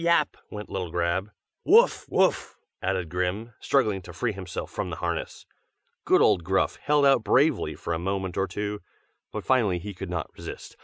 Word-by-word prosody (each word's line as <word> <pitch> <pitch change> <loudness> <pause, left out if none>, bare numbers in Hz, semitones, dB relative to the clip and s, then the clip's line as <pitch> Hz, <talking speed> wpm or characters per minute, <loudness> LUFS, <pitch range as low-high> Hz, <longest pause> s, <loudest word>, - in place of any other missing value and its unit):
yap!" 170 -3 +3
went 105 0 -7
little 90 -3 -4
Grab; 85 +4 -1 0.3
"Woof! - - +5
woof!" - - +1 0.2
added 95 -2 -1
Grim, 90 +7 -2
struggling 105 -8 +1
to 90 - -10
free 115 +8 -1
himself 95 -3 -6
from - - -3
the - - -4
harness. - - -4 0.6
Good - - +5
old 85 - +4
Gruff 95 +2 +1
held 145 -1 +2
out 135 -4 +5
bravely 120 - +2
for 85 - -4
a 80 - -1
moment 95 0 -2
or 95 0 0
two; 105 +2 -4 0.5
but - - -5
finally 115 -9 +3
he 100 +4 -6
could 95 0 -7
not 90 -3 -3
resist. - - -9
95 Hz, 175 wpm, -26 LUFS, 90-110 Hz, 0.6 s, Woof